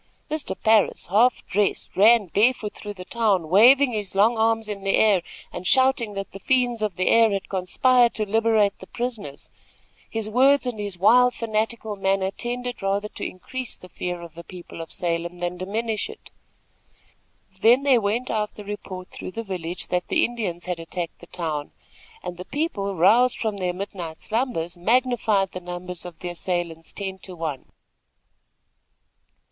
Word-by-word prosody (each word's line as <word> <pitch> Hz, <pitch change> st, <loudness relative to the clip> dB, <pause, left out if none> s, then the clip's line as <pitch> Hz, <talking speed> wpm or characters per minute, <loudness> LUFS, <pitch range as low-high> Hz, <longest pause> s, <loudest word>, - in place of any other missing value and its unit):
Mr. 310 Hz, -2 st, -2 dB
Parris, 220 Hz, -2 st, +3 dB
half 235 Hz, +5 st, +3 dB
dressed, 200 Hz, 0 st, -1 dB
ran 220 Hz, +2 st, +6 dB
barefoot 210 Hz, +4 st, +1 dB
through 205 Hz, -1 st, -8 dB
the 180 Hz, -1 st, -9 dB
town, 200 Hz, -9 st, +1 dB
waving 250 Hz, -, +6 dB
his 205 Hz, -3 st, -3 dB
long 215 Hz, +4 st, +4 dB
arms 225 Hz, 0 st, +1 dB
in 205 Hz, -2 st, -5 dB
the 195 Hz, 0 st, +1 dB
air, 205 Hz, -4 st, +4 dB, 0.3 s
and 180 Hz, -, -4 dB
shouting 260 Hz, -4 st, +3 dB
that 195 Hz, 0 st, -5 dB
the 195 Hz, -, -9 dB
fiends 245 Hz, +1 st, +1 dB
of 210 Hz, -4 st, -1 dB
the 185 Hz, -, -1 dB
air 230 Hz, -1 st, +6 dB
had 195 Hz, -2 st, -2 dB
conspired 240 Hz, +6 st, +3 dB
to 215 Hz, -, 0 dB
liberate 220 Hz, -1 st, +3 dB
the 190 Hz, -, -11 dB
prisoners. 230 Hz, -, -5 dB, 0.6 s
His 225 Hz, -1 st, -2 dB
words 265 Hz, +5 st, +4 dB
and 245 Hz, -4 st, -3 dB
his 205 Hz, -3 st, -4 dB
wild, 245 Hz, +6 st, +5 dB
fanatical 220 Hz, -1 st, -2 dB
manner 195 Hz, 0 st, 0 dB
tended 245 Hz, +2 st, -4 dB
rather 200 Hz, +2 st, -1 dB
to -, -, -7 dB
increase 255 Hz, +7 st, -6 dB
the 185 Hz, -, -14 dB
fear 180 Hz, -1 st, -4 dB
of 170 Hz, -2 st, -11 dB
the 170 Hz, -, -10 dB
people 175 Hz, -1 st, -10 dB
of 165 Hz, -, -9 dB
Salem, 170 Hz, 0 st, -2 dB
than 175 Hz, 0 st, -3 dB
diminish 215 Hz, -, -2 dB
it. 440 Hz, -, -12 dB, 1.3 s
Then 240 Hz, +6 st, +5 dB
there 260 Hz, -4 st, +4 dB
went 220 Hz, +5 st, -1 dB
out 210 Hz, -1 st, -2 dB
the 210 Hz, -, -10 dB
report 190 Hz, -3 st, -7 dB
through 185 Hz, -, -8 dB
the 230 Hz, -, -4 dB
village 180 Hz, -3 st, -5 dB
that 180 Hz, 0 st, -1 dB
the -, -, +3 dB
Indians 205 Hz, -8 st, -4 dB
had 180 Hz, -2 st, -3 dB
attacked 165 Hz, +1 st, -5 dB
the 175 Hz, -, -14 dB
town, 155 Hz, -5 st, -4 dB, 0.5 s
and 175 Hz, -, -6 dB
the 180 Hz, -, -7 dB
people, 205 Hz, -, -2 dB
roused 225 Hz, +9 st, +4 dB
from 215 Hz, -3 st, -2 dB
their 180 Hz, -2 st, -1 dB
midnight 180 Hz, -3 st, -6 dB
slumbers, 220 Hz, -8 st, -2 dB
magnified 220 Hz, -1 st, +2 dB
the 185 Hz, -, -6 dB
numbers 180 Hz, 0 st, -7 dB
of 175 Hz, -2 st, -9 dB
the 180 Hz, -, -4 dB
assailants 175 Hz, -2 st, -3 dB
ten 190 Hz, -2 st, -4 dB
to 185 Hz, 0 st, -9 dB
one. 160 Hz, -5 st, -4 dB
205 Hz, 170 wpm, -24 LUFS, 180-230 Hz, 1.3 s, ran